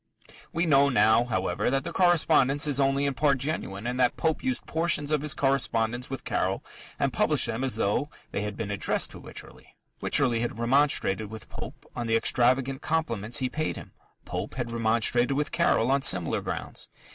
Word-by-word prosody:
We 170 +2 0
know, 140 -3 +4
now, 110 -1 +4
however, 95 -6 -1
that 135 +1 0
the 170 - -6
correspondence 155 -6 +3
is 145 -2 +1
only 135 +1 +2
in 140 - 0
part 140 +2 +2
genuine, 125 -8 -4
and 125 +1 -2
that 125 -1 +2
Pope 160 -1 0
used 260 -1 -2
portions 160 -2 0
of 150 -2 +1
his 150 -1 0
correspondence 125 -3 0
with 135 -1 -5
Caryll - - -1 0.3
and - - 0
published - - +1
them 115 +4 -3
as 130 - 0
though 105 +9 0 0.2
they - - -2
had 105 0 -4
been 105 -2 -4
addressed 100 - +1
to - - -8
Wycherley. - - -13 0.3
Wycherley 125 -5 +2
had 115 -2 -3
remonstrated 115 -4 +2
with 110 0 -10
Pope - - -9
on 120 -1 -3
the 115 - +2
extravagant 130 +4 +2
compliments 120 -9 -1
he 130 - +1
paid 155 +4 -2
him: - - -10 0.3
Pope - - -5
had 120 -2 -3
remonstrated 115 +3 +2
with 150 +2 -1
Caryll 130 -7 +2
on 140 0 +2
similar 90 -9 +1
grounds. - - -5
130 Hz, 185 wpm, -27 LUFS, 115-145 Hz, 0.3 s, know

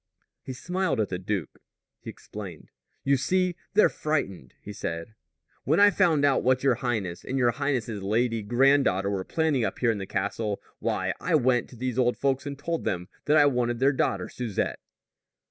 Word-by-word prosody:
He 130 - -7
smiled 180 +2 -1
at 105 - 0
the 90 - -3
duke. 95 -3 -4 0.4
He - - -9
explained. 95 -6 -9 0.3
"You 140 0 +3
see, 180 +6 +1 0.2
they're 215 - +7
frightened," 120 - -3
he 105 - -9
said. 85 +2 -5 0.5
"When 155 +6 +2
I 205 0 +7
found 165 -8 +3
out 140 -2 +3
what 130 +1 +2
your 135 -2 +4
highness 105 -9 -2
and 135 - -3
your 120 -2 +3
highness's 120 -6 -2
lady 115 +3 0
granddaughter 120 -4 +3
were 95 -2 -2
planning 155 - 0
up 100 - -2
here 120 -2 +2
in 105 - -3
the 95 - -5
castle, 100 +1 -2 0.2
why, - - -1
I 175 - +1
went 125 -4 +2
to - - -13
these 125 +1 -2
old 125 -1 +2
folks 135 0 0
and 140 -1 -5
told 165 +3 -3
them 90 0 -2 0.2
that 150 +1 +4
I 145 - +7
wanted 125 -3 +1
their 135 +3 +3
daughter 130 - 0
Susette." 115 -6 -3
125 Hz, 185 wpm, -27 LUFS, 105-140 Hz, 0.5 s, they're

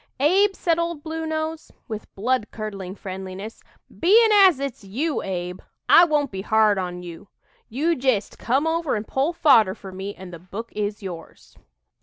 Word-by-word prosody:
"Abe," 385 +8 +3
said 335 -1 0
"Old 335 -3 -3
Blue 320 0 -4
Nose," 315 0 -4 0.2
with 215 -2 -6
bloodcurdling 210 -4 -3
friendliness, 190 +2 -7 0.4
"bein' 435 +6 +5
as 385 -8 +6
it's 275 -6 -5
you, 270 +11 -2
Abe, 180 -1 -4 0.3
I 345 - +8
won't 295 -4 0
be 190 -1 -5
hard 215 -1 +3
on 180 -1 -5
you. 175 +3 -10 0.4
You 310 +9 0
jest 250 -6 -1
come 265 +6 +1
over 325 -3 0
and 215 0 -4
pull 275 +5 0
fodder 235 - +4
for 195 -3 -10
me, 195 +2 -6
and 185 -1 -11
the 170 - -8
book 200 +6 -8
is 210 0 -3
yours." 170 -4 -10
225 Hz, 165 wpm, -23 LUFS, 195-315 Hz, 0.4 s, I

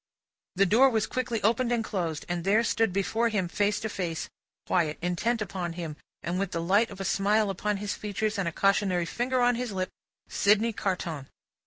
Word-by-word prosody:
The 195 +2 +4
door 235 +8 +5
was 220 -3 +1
quickly 240 -5 -2
opened 235 +3 +2
and 235 -2 +1
closed, 170 -8 -3
and 175 -1 -2
there 210 +5 +3
stood 225 -3 +1
before 220 +5 +1
him 205 -5 0
face 205 +3 0
to 220 - -2
face, 175 -6 -4 0.3
quiet, 160 -4 +1
intent 215 +7 0
upon 175 -3 -4
him, 165 -3 -5 0.3
with 180 +2 -2
the 170 - -1
light 200 +7 +3
of 195 - -10
a 195 - -3
smile 205 0 +2
on 210 -1 +1
his 205 0 -3
features, 210 +1 -2
and 190 - 0
a - - -1
cautionary 195 -1 +2
finger 245 +9 -1
on 245 0 +4
his 245 -1 -3
lip, 185 -1 -2 0.4
Sydney 215 +3 +3
Carton. 170 -9 -3
200 Hz, 190 wpm, -28 LUFS, 180-225 Hz, 0.4 s, door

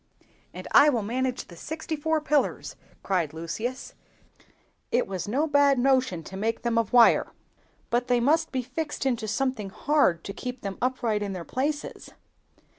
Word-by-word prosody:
"And - - -8
I 295 - +7
will 235 -7 0
manage 250 +4 -2
the 175 - -13
sixty 315 - -5
four 315 +1 0
pillars!" 300 -1 0 0.3
cried 175 -6 0
Lucius; 190 +11 -5 1.0
"it 245 - +2
was 190 0 -5
no 270 +9 +1
bad 285 -2 +4
notion 255 -9 +2
to 190 - -10
make 220 +3 -2
them 235 -1 +1
of 225 -3 -2
wire. 240 -2 +5 0.6
But 240 +1 +1
they 245 -1 +3
must 305 +7 +2
be 260 -2 -2
fixed 295 +3 -4
into 240 -4 0
something 220 -2 -1
hard, 215 - +1
to 200 - -6
keep 250 +2 -6
them 195 -1 -5
upright 240 -4 0
in 200 -1 -3
their 175 -3 -6
places." 290 +4 -3
245 Hz, 165 wpm, -26 LUFS, 210-275 Hz, 1.0 s, I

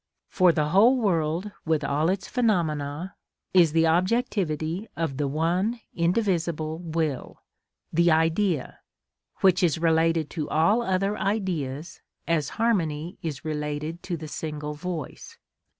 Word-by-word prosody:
For 185 -2 +4
the 150 -2 0
whole 220 +10 +5
world, 175 -3 0
with 160 -2 0
all 150 +4 +1
its 190 +1 -2
phenomena, 170 - -1 0.4
is 175 -4 +6
the 165 +1 +3
objectivity 175 -1 0
of 160 -5 -2
the 145 -1 0
one 175 - 0
indivisible 170 -4 0
will, 160 -5 -3 0.5
the 170 +2 +4
Idea, 165 0 +1 0.6
which 185 -2 +4
is 170 -3 +2
related 165 -1 +2
to 155 -4 -4
all 165 +10 +3
other 195 -1 0
Ideas 165 -7 -2 0.3
as 155 -4 +1
harmony 175 -8 0
is 155 -3 -5
related 150 +2 -3
to 175 -3 -4
the 155 0 -7
single 150 -1 -5
voice. 160 -2 -6
165 Hz, 125 wpm, -26 LUFS, 155-185 Hz, 0.6 s, is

